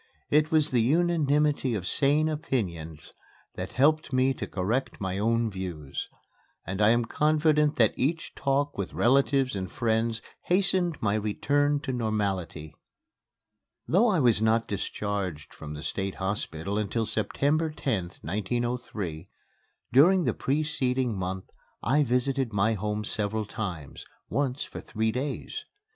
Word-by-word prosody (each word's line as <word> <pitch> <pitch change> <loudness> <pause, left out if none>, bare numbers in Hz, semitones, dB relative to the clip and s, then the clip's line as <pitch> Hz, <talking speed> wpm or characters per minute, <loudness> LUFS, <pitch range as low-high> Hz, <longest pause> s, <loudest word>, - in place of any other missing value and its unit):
It 150 +1 +4
was 155 -2 +2
the 120 -3 +3
unanimity 150 -2 +2
of 95 -4 -3
sane 145 +8 +3
opinions 90 - -3 0.4
that - - -6
helped 155 +3 +3
me 130 +1 +3
to - - -5
correct 110 +8 -2
my 95 0 -2
own 115 +1 +1
views; 90 -7 -5 0.6
and 95 +3 -3
I 105 - +6
am 120 +1 +3
confident 150 +2 +2
that 110 -4 +4
each 155 +5 -1
talk 140 -2 0
with 100 - -4
relatives 135 0 +3
and 95 -1 -4
friends 115 -2 0 0.2
hastened 180 -3 +2
my 100 -1 +2
return 145 +7 +1
to 130 - -3
normality. 100 -9 -2 1.1
Though 190 - +4
I 195 -6 +3
was 120 -6 +3
not 115 +1 +2
discharged 100 -5 -3
from 75 -1 -8
the 75 - -7
State 95 +4 -3
Hospital 95 -1 -2
until 110 +2 -1
September 145 +9 0
10th, 105 - -3
1903, 105 -3 -3 0.6
during 175 +8 +6
the - - +1
preceding 130 -4 0
month 95 0 -3 0.4
I 145 +7 +3
visited 125 0 0
my 105 +2 +2
home 105 +1 -2
several 110 0 -2
times, 90 -9 -6 0.2
once 140 -1 0
for - - -8
three 110 0 -1
days. 135 +4 -4
115 Hz, 135 wpm, -27 LUFS, 100-145 Hz, 1.1 s, I